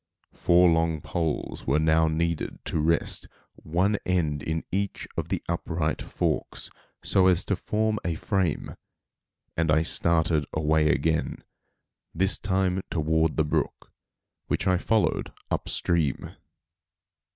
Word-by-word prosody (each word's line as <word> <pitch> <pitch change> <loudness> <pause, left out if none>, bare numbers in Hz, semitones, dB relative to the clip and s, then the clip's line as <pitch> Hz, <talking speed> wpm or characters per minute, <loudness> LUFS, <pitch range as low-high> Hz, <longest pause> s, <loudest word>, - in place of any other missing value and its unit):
Four 90 +1 +4
long 80 -1 +1
poles 80 0 -3
were 70 +3 +3
now 80 +1 +3
needed 85 +1 -1
to - - -1
rest 85 +2 +1 0.3
one 95 +6 0
end 80 -6 0
in 80 +2 -2
each 100 +1 -2
of - - -3
the - - -2
upright 80 -2 -2
forks, - - -2 0.3
so 95 -1 +4
as 90 -1 +3
to 100 - 0
form 110 +3 -1
a 85 -2 -1
frame, 95 -2 -1 0.8
and 85 -1 0
I 80 +1 +4
started 80 -3 +2
away 80 0 +2
again, 80 +3 0 0.7
this 95 +4 +2
time 95 -1 0
toward 80 0 +1
the 80 - +3
brook, 75 - -2 0.6
which - - -1
I 90 -1 +3
followed 110 +2 +1 0.2
up - - -2
stream. 80 -6 -1
80 Hz, 130 wpm, -26 LUFS, 80-90 Hz, 0.8 s, Four